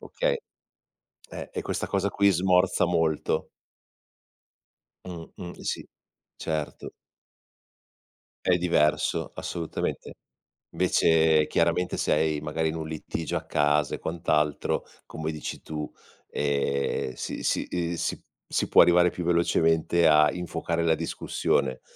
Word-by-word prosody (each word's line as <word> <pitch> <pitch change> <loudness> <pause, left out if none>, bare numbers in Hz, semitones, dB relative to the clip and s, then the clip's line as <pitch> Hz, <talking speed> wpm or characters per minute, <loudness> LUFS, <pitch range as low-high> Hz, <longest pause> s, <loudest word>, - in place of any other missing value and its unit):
okay. - - -1 1.2
E 440 - -2
questa - - -3
cosa 100 0 0
qui 100 0 +3
smorza 90 0 +3
molto. 80 -3 0 1.6
Mh-mh, 90 0 -9
sì, - - -2 0.5
certo. 80 -2 -4 1.5
È 90 -1 +4
diverso, 85 -4 +1
assolutamente. 85 -2 -4 0.6
Invece, 80 -1 +3
chiaramente, 85 +2 +1
sei, 75 0 +1
magari, 80 +2 -1
in 80 - -4
un 80 -1 -4
litigio 80 +1 -4
a - - -2
casa 75 -1 +1
e - - -10
quant'altro, 75 -3 0 0.2
come 80 0 -5
dici 75 - -6
tu, 75 -1 -5 0.4
ehm, 70 -2 -1
si - - -5
si - - 0 0.8
si - - 0
può - - +7
arrivare 90 0 +5
più 90 - -5
velocemente 85 -1 +3
a 75 -1 +6
infuocare 85 -1 -2
la 80 -1 +3
discussione. 70 -4 -1
80 Hz, 105 wpm, -26 LUFS, 75-85 Hz, 1.6 s, può